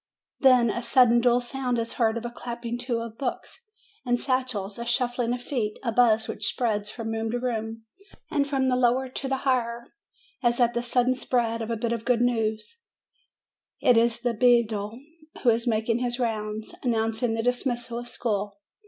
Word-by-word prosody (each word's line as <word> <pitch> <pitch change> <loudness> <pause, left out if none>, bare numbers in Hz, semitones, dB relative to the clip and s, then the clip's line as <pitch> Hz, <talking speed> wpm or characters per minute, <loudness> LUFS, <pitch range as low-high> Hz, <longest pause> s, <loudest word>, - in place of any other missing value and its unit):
Then 250 -4 +5
a 240 - -3
sudden 240 0 +4
dull 245 0 +3
sound 250 0 -2
is 230 0 -2
heard, 225 -2 +1
a 240 - -4
clapping 235 -1 -5
to 240 -2 -2
of 230 -1 -8
books 280 - -5 0.4
and 245 -1 +1
satchels, 245 -7 -2
a 235 - -4
shuffling 240 0 0
of 245 0 -3
feet, 220 -7 -2
a 235 - 0
buzz 225 -2 +3
which 210 - -3
spreads 210 -4 -1
from 225 0 -5
room 225 0 -2
to 245 +2 -1
room, 225 -2 -3 0.5
and 280 -1 +1
from 270 -2 +1
the 255 - +2
lower 255 +1 +2
to 270 +1 -3
the 270 0 0
higher, 235 -2 0 0.6
as 240 0 +1
at 240 -1 +3
the 240 - 0
sudden 245 +1 +2
spread 235 -3 -1
of 225 - -4
a 230 - 0
bit 235 +1 -1
of 230 -1 -4
good 245 -2 +2
news: 225 - -1 1.0
it 250 - +4
is 235 +1 +2
the 240 -1 0
beadle, 225 -2 +2 0.4
who 240 - +6
is 230 +2 -1
making 225 +1 +1
his 245 -1 -1
rounds, 215 -2 -3
announcing 225 -1 0
the 225 - -2
dismissal 240 -1 -1
of 240 0 -8
school. 205 -3 -2
235 Hz, 185 wpm, -26 LUFS, 225-245 Hz, 1.0 s, who